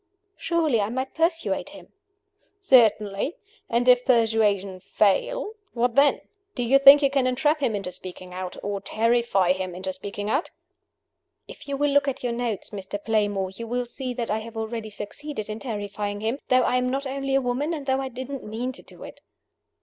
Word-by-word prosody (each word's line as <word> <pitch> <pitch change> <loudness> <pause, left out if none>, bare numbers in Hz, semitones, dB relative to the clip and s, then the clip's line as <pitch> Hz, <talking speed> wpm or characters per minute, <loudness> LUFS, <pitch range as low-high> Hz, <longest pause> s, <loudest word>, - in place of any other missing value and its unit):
"Surely 315 -9 +1
I 200 - -1
might 260 +3 -3
persuade 330 +1 0
him?" - - -13 0.7
"Certainly. 225 - +3 0.3
And 240 +2 +1
if 250 0 +6
persuasion 215 -6 +2
fail 405 - 0 0.2
what 240 0 +1
then? 280 +3 +4 0.3
Do 245 - -1
you 265 +4 +4
think 275 +1 +9
you 275 - +3
can 270 -2 +2
entrap 295 +5 +1
him 240 -6 0
into 195 -3 -4
speaking 180 0 -9
out? 185 0 -6
or 200 -1 -3
terrify 225 -5 +2
him 185 -1 -5
into 190 +1 -4
speaking 200 +2 -6
out?" 275 +9 0 1.0
"If - - -12
you 280 -1 -2
will 290 0 +1
look 285 0 +3
at 270 - -3
your 245 -1 -1
notes, 235 -4 -3
Mr. 200 -1 -5
Playmore, 205 -4 0
you 230 +4 -8
will 245 +1 -1
see 255 +1 -5
that 235 -3 -3
I 215 - 0
have 225 +1 -9
already 220 0 -4
succeeded 215 +3 -6
in 215 +1 -5
terrifying 205 -3 -4
him 225 +5 -1
though 255 0 +4
I 250 - +2
am 250 0 0
only 275 0 -2
a 270 - +3
woman 255 +5 -1
and 300 -4 -4
though 265 0 +1
I 265 - -4
didn't 260 +2 -6
mean 230 +4 -4
to - - -11
do - - -14
it." - - -11
235 Hz, 190 wpm, -25 LUFS, 205-270 Hz, 1.0 s, think